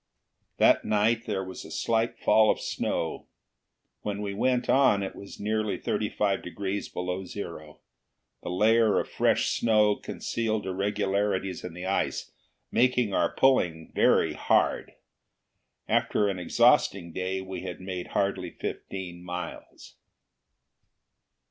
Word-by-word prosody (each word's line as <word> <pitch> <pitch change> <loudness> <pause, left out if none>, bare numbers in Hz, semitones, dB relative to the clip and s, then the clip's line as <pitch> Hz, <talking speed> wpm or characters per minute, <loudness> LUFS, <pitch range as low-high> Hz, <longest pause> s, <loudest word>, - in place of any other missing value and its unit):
That - - +5
night 110 +3 +1
there 100 -3 -1
was 95 0 -8
a - - -11
slight 115 0 0
fall 110 -1 +4
of - - +2
snow. - - -3 0.7
When 105 0 -3
we 100 -1 -3
went 125 +4 +1
on 130 -7 +4
it 95 - -5
was 100 - -10
nearly 110 0 -1
thirty 105 - -1
five 100 -2 0
degrees 100 +2 -4
below 90 +1 -3
zero. 85 -5 -8 0.6
The - - -6
layer 110 +4 +3
of - - -3
fresh - - +1
snow 105 -2 +3
concealed 110 -1 -3
irregularities 95 0 -1
in 90 -2 -7
the 90 +1 -6
ice, 95 +1 -1 0.4
making 125 -4 +2
our 85 -2 +2
pulling 85 -12 +2
very - - +3
hard. - - +1 0.9
After 105 -1 +2
an 95 -2 -3
exhausting 85 -1 +3
day 95 +1 -2
we 95 -1 -6
had 90 -1 -6
made 90 -1 -5
hardly 95 -2 -1
fifteen 90 0 -6
miles. 90 -1 -8
100 Hz, 130 wpm, -27 LUFS, 90-110 Hz, 0.9 s, That